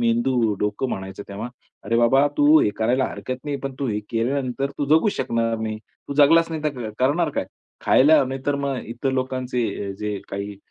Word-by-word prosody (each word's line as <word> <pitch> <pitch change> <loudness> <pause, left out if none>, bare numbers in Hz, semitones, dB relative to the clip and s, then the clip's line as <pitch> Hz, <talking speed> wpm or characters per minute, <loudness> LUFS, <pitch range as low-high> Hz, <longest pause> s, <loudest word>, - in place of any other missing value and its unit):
मेंदू, 120 -1 +2
डोकं 105 +5 -1
म्हणायचं 95 -1 -5
तेव्हा, 100 +4 -5 0.4
"अरे 115 +2 0
बाबा 135 +4 +4
तू 150 +2 +6
हे 105 - +2
करायला 125 +4 +2
हरकत 130 +2 -6
नाही, 145 -1 -2
पण 135 -1 -4
तू 140 - -1
हे 105 -1 -1
केल्यानंतर 130 +3 -1
तू 145 - 0
जगू 160 +7 +4
शकणार 115 -1 0
नाही. 110 -1 -3 0.3
तू 140 - -3
जगलाचं 165 +3 +5
नाही 155 - -4
तर 125 -7 -2
क - - -15
करणार 150 +5 +2
काय?" - - 0 0.4
खायला 150 +4 +6
नाहीतर 135 +2 -2
मग 135 -2 -1
इतर 120 +4 -2
लोकांचे 125 -6 -2
जे 105 -1 -3
काही 100 0 -5
125 Hz, 185 wpm, -23 LUFS, 110-140 Hz, 0.4 s, तू